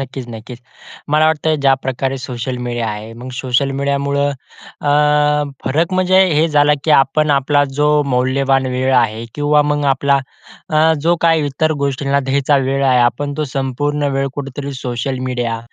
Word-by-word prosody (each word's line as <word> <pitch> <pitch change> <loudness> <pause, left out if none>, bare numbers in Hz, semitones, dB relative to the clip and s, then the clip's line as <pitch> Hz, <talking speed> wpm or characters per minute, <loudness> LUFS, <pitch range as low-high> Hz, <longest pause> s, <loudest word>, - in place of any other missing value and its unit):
नक्कीच-नक्कीच. 125 -3 -8 0.5
मला 155 +1 +3
वाटतं 160 0 +1
ज्या 135 -1 +4
प्रकारे 130 +1 -2
सोशल 125 0 -5
मीडिया 120 -2 -2
आहे. 105 +1 -6
मग 120 +3 -10
सोशल 130 +1 0
मीडियामुळं 140 0 0 0.5
अ, 145 -1 +2 0.7
फरक 160 +7 0
म्हणजे, 185 0 +3
हे 155 +2 +3
झाला 150 0 +3
की 155 - 0
आपण 150 +2 +3
आपला 145 +1 +2 0.2
जो 150 - +3 0.2
मौल्यवान 135 +1 +1
वेळ 130 +1 -1
आहे 115 -2 +1
किंवा 150 0 +2
मग 145 -1 0
आपला 140 +1 +1 0.5
अ, 155 +1 +4
जो 170 +3 +2
काही 165 -3 +2
इतर 155 +3 0
गोष्टींना 140 +1 0
द्यायचा 140 +1 +2
वेळ 135 +1 0
आहे. 130 -2 +3
आपण 145 +4 0
तो 155 - -1
संपूर्ण 145 +2 -1
वेळ 135 0 0
कुठेतरी 140 0 -6
सोशल 125 +1 -3
मीडिया 120 -2 -2
140 Hz, 155 wpm, -17 LUFS, 130-145 Hz, 0.7 s, ज्या